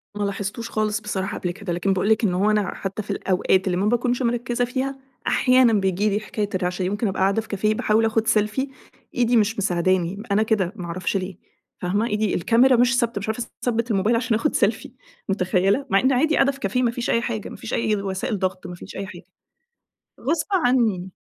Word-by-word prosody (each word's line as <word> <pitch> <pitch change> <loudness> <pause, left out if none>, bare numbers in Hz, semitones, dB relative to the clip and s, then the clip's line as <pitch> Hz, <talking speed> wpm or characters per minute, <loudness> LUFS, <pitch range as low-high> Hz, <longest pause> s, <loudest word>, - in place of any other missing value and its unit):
ما 205 - -2
لاحظتوش 200 +3 -3
خالص 215 -1 0
بصراحة 195 -2 -3
قبل 180 - -2
كده، 185 -1 -5
لكن 190 +3 0
بأقول 190 +3 0
لِك 220 +1 +3
إن 190 - +2
هُو 200 +4 +2
أنا 210 -3 0
حتى 195 +2 -4
في 210 - -6
الأوقات 190 -1 +1
اللي 180 - +1
ما 195 - 0
باكونش 240 +3 +1
مركّزة 240 0 0
فيها، 265 +2 -3 0.3
أحيانًا 255 -3 +4
بيجيلي 200 +1 +1
حكاية 210 -1 -3
الرعشة 180 0 -1
دي، 180 - 0
ممكن 205 +2 -1
أبقى 190 0 -2
قاعدة 195 +3 +2
في 220 - -15
كافيه 215 +2 0
باحاول 215 +1 +2
آخد 225 0 0
سيلفي، 225 +5 +1 0.5
إيدي 240 -1 +3
مش 220 +1 +2
مساعداني، 185 -1 +1
م 210 - -8
أنا 215 +2 +3
كده، 210 -4 0
ما 180 -5 -6
أعرفش 180 +3 -2
ليه، 185 -1 -5 0.5
فاهمة؟ 205 +6 0
إيدي 210 -1 0
الكاميرا 245 +8 +4
مش 240 0 +3
ثابتة، 235 -3 0
مش 200 - -6
عارفة 230 +2 -2 0.2
أثبِّت 235 -1 0
الموبايل 210 +3 +2
عشان 230 -1 +1
آخد 300 - -1
سيلفي، - - 0 0.4
مُتخيلة؟! 195 +6 +1
مع 195 -2 +4
إن 260 - +2
عادي 305 +5 +2
قاعدة 275 0 +4
في 275 - -13
كافيه، 250 +5 0
ما 235 - +2
فيش 235 0 -4
أي 230 - +2
حاجة، 225 -3 -4
ما - - -9
فيش - - -7
أي 215 -2 +1
وسائل 195 +2 -3
ضغط، 185 0 -2
ما 175 - -7
فيش - - -11
أي 195 0 -4
حاجة. - - -11 1.0
غصب 305 +5 0
عني، 235 - +2
210 Hz, 215 wpm, -23 LUFS, 190-235 Hz, 1.0 s, أحيانًا